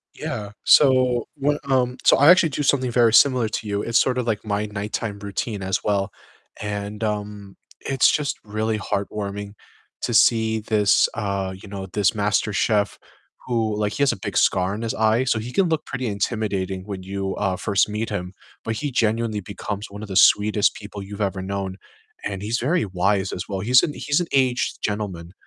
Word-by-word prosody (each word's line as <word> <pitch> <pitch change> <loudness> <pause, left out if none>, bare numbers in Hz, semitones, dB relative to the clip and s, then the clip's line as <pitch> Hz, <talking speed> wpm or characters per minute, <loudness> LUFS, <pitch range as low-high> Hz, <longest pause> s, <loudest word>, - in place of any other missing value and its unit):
Yeah, 105 -1 -5
so 130 -4 +5
when, 145 +1 0
um 125 -2 +1
So - - +6
I 145 +3 +6
actually 180 -2 +6
do 145 +1 -3
something 130 -3 +2
very 115 -2 +4
similar 125 -2 +5
to 110 0 -4
you. 100 0 -1
It's 115 +1 +2
sort 125 -1 +1
of 125 - -1
like 110 -2 -1
my 105 0 -1
nighttime 105 0 -4
routine 100 +1 -4
as 95 0 -2
well. 100 -2 0 0.5
And, 105 +1 -4
um, 105 -2 -4 0.3
it's 135 -1 +3
just 145 -2 -1
really 110 +1 -2
heartwarming 100 0 -4 0.5
to 120 - -2
see 110 -1 +4
this, 105 -2 +3
uh, 100 -2 -2
you 95 +2 -13
know, 95 -1 -6
this 105 -1 +2
master 105 0 +1
chef 105 0 +1 0.5
who 110 -4 0
like, 105 -1 -1
he 140 - 0
has 140 - +4
a - - -5
big - - -6
scar 95 +2 +2
on 110 - -5
his 115 - -2
eye, 110 +3 +2
so 120 -3 +1
he 120 +3 -6
can 195 -3 +3
look 160 -2 -1
pretty 130 -2 -4
intimidating 100 -3 -2
when 100 -2 -6
you, 95 0 -3
uh, 95 -2 -1
first 100 +1 +1
meet 110 +2 -3
him. 90 -3 -4 0.3
But 115 - -2
he 145 +2 -3
genuinely 115 -2 0
becomes 100 +1 -6
one 105 +1 -9
of 105 - -8
the 95 - -5
sweetest 105 0 +4
people 100 -1 -8
you've 100 +2 -8
ever 95 -2 -1
known, 95 0 -4 0.5
and 95 -1 -4
he's 110 +4 -1
very 165 +9 +1
wise 95 +1 0
as 90 - -5
well. 95 -2 -3
He's 125 +5 +5
an 150 - -1
he's 145 +3 0
an 175 - -2
aged 130 -2 +1
gentleman. 95 -5 -3
105 Hz, 195 wpm, -23 LUFS, 100-120 Hz, 0.5 s, So